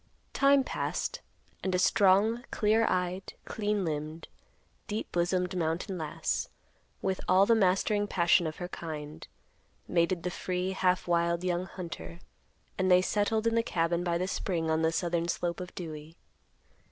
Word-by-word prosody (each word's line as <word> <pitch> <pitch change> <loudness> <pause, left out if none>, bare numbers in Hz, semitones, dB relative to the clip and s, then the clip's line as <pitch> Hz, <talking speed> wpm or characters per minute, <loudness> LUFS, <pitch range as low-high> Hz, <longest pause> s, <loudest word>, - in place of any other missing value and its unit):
Time 275 0 +5
passed, - - -3 0.4
and 185 -1 0
a - - +3
strong, 205 +4 +4
clear 220 +1 +2
eyed, 185 +1 -2
clean 210 -2 -1
limbed, 155 +1 -4 0.6
deep 215 0 -4
bosomed 180 +1 0
mountain 170 +2 -1
lass, 155 -2 -2 0.5
with 190 -1 -1
all 185 +2 +5
the 230 - +4
mastering 205 0 +2
passion 175 -2 +3
of 155 - -5
her 175 - -5
kind, 155 -4 -7 0.6
mated 170 0 +1
the 180 - -2
free, 180 +1 -2
half 185 -2 +1
wild, 170 0 +1
young 180 0 -1
hunter; 170 -2 -7 0.6
and 185 0 +2
they 180 0 +7
settled 215 +2 +1
in 230 - +2
the 230 - +3
cabin 170 -5 0
by 170 -1 0
the 180 +2 -1
spring 170 -4 -1
on 160 0 +1
the 160 0 +2
southern 170 0 0
slope 175 0 -2
of 180 -1 -6
Dewey. 160 -2 -8
180 Hz, 155 wpm, -30 LUFS, 170-195 Hz, 0.6 s, they